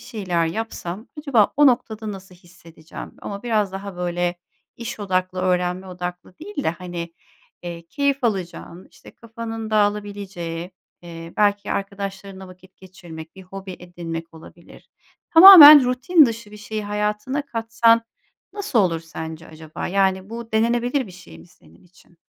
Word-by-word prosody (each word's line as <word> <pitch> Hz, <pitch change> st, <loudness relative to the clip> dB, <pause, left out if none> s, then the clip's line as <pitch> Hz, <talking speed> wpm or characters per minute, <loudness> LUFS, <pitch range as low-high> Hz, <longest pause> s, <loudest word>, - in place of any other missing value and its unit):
şeyler 185 Hz, -9 st, -2 dB
yapsam 215 Hz, +1 st, -6 dB
acaba 270 Hz, -9 st, +2 dB
o 295 Hz, -, +6 dB
noktada 225 Hz, -4 st, 0 dB
nasıl 190 Hz, -1 st, -12 dB
hissedeceğim? 170 Hz, -2 st, -13 dB
Ama 200 Hz, 0 st, -6 dB
biraz 215 Hz, -5 st, 0 dB
daha 195 Hz, -1 st, -7 dB
böyle 175 Hz, 0 st, -2 dB, 0.4 s
iş 235 Hz, -2 st, -7 dB
odaklı, 185 Hz, -2 st, -1 dB
öğrenme 180 Hz, 0 st, -1 dB
odaklı 180 Hz, 0 st, -7 dB
değil 330 Hz, -4 st, -6 dB
de, -, -, +2 dB
hani, 170 Hz, -1 st, -7 dB, 0.5 s
eee, 170 Hz, -1 st, -8 dB
keyif 280 Hz, -, -1 dB
alacağın, 180 Hz, -4 st, -4 dB
işte, -, -, -16 dB
kafanın 225 Hz, -1 st, -7 dB
dağılabileceği, 200 Hz, -5 st, -2 dB, 0.3 s
eee, 165 Hz, -1 st, -10 dB
belki 205 Hz, -1 st, +1 dB
arkadaşlarınla 195 Hz, -1 st, -6 dB
vakit 185 Hz, +1 st, -18 dB
geçirmek, 170 Hz, -4 st, -12 dB
bir 190 Hz, -, -11 dB
hobi 190 Hz, 0 st, -9 dB
edinmek 165 Hz, -2 st, -8 dB
olabilir. 165 Hz, +1 st, -16 dB, 0.4 s
Tamamen 320 Hz, -6 st, +11 dB
rutin 275 Hz, +6 st, +4 dB
dışı 230 Hz, -2 st, -6 dB
bir 210 Hz, -, -11 dB
şeyi 210 Hz, 0 st, -6 dB
hayatına 210 Hz, +7 st, -2 dB
katsan 230 Hz, 0 st, +2 dB, 0.5 s
nasıl 405 Hz, -, -2 dB
olur 175 Hz, -5 st, +1 dB
sence 160 Hz, 0 st, -8 dB
acaba? 155 Hz, 0 st, -8 dB
Yani, 190 Hz, +1 st, 0 dB
bu 230 Hz, 0 st, -8 dB
denenebilir 240 Hz, +3 st, +1 dB
bir 185 Hz, -, -12 dB
şey 175 Hz, -, -14 dB
mi 80 Hz, -, -16 dB
senin 80 Hz, -, -23 dB
için? 175 Hz, -1 st, -24 dB
195 Hz, 140 wpm, -22 LUFS, 175-225 Hz, 0.5 s, Tamamen